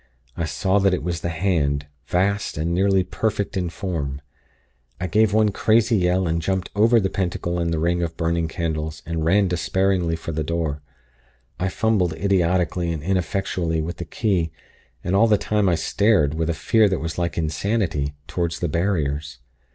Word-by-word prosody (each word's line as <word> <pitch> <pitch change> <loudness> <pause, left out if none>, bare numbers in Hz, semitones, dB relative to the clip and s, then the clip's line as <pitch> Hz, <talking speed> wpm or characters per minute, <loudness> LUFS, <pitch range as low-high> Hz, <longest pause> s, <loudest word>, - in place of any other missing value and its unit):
I 85 - -2
saw 95 +6 +1
that 100 -2 +3
it 90 - -5
was 85 0 -2
the 85 - -2
Hand, 80 -5 0 0.2
vast 100 +1 0
and 80 +3 -1
nearly 95 +1 +3
perfect 105 +1 -2
in 90 -2 -1
form. 80 -7 -4 0.8
I 90 - -2
gave 105 +4 +3
one 110 0 +3
crazy 110 +3 +3
yell, 90 -1 +2
and 85 0 0
jumped 95 +2 -2
over 115 +3 +5
the 95 - +1
Pentacle 90 -2 -2
and 85 -1 0
the 80 - 0
ring 85 +2 +1
of 85 -1 -3
burning 85 0 0
candles, 80 -2 -3
and 80 0 -2
ran 100 +5 +3
despairingly 90 -1 +1
for 80 0 -6
the 80 0 -2
door. 80 -2 -2 0.8
I 90 - 0
fumbled 95 -4 +1
idiotically 90 -1 +1
and 80 -3 -4
ineffectually 90 -2 -1
with 85 +2 -5
the 85 - -5
key, 90 -8 0 0.5
and 90 +2 0
all 115 +4 +5
the 105 -2 +4
time 105 -1 +1
I 85 - +3
stared, 85 -1 +2
with 80 +1 -1
a 85 - 0
fear 110 +5 +3
that 95 - 0
was 80 +2 -4
like 85 -1 -2
insanity, 80 -2 -1
toward 85 -2 -1
the 85 - -2
Barriers. 75 -5 -1
85 Hz, 180 wpm, -23 LUFS, 80-95 Hz, 0.8 s, over